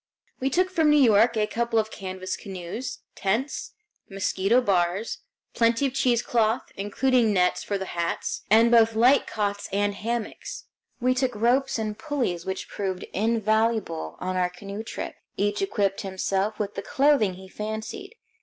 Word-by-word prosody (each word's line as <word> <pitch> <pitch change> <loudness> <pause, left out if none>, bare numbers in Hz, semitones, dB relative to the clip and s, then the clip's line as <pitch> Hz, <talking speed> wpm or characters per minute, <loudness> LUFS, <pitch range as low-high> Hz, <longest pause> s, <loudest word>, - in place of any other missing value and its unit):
We 265 - 0
took 365 +6 +1
from 320 -4 +3
New 295 - +6
York 230 -3 +5
a 210 - +3
couple 230 +1 -1
of 220 0 +1
canvas 185 -1 -5
canoes, 195 +6 -6
tents, 220 +9 -2 0.4
mosquito 195 +3 +2
bars, 190 -2 0 0.3
plenty 230 +3 +2
of 265 - -1
cheesecloth, 235 -3 +1
including 225 +3 +2
nets 180 -2 +2
for 200 - -2
the 190 - -4
hats, 170 -1 -2
and 225 +3 +6
both 225 -1 +5
light 250 +5 +5
cots 205 -1 -2
and 205 +1 +1
hammocks. 235 - -4 0.4
We 255 0 +2
took 255 -1 0
ropes 250 +5 +2
and 215 -1 -3
pulleys 245 - -2
which 190 0 -3
proved 190 -2 -3
invaluable 220 -4 0
on 185 0 -3
our 180 -1 +2
canoe 200 +3 -7
trip. 225 - -6 0.2
Each 205 - 0
equipped 205 - 0
himself 195 +1 -1
with 205 -1 -3
the - - -4
clothing 270 -7 +2
he 190 +1 -11
fancied. 220 - -6
220 Hz, 155 wpm, -25 LUFS, 195-240 Hz, 0.4 s, New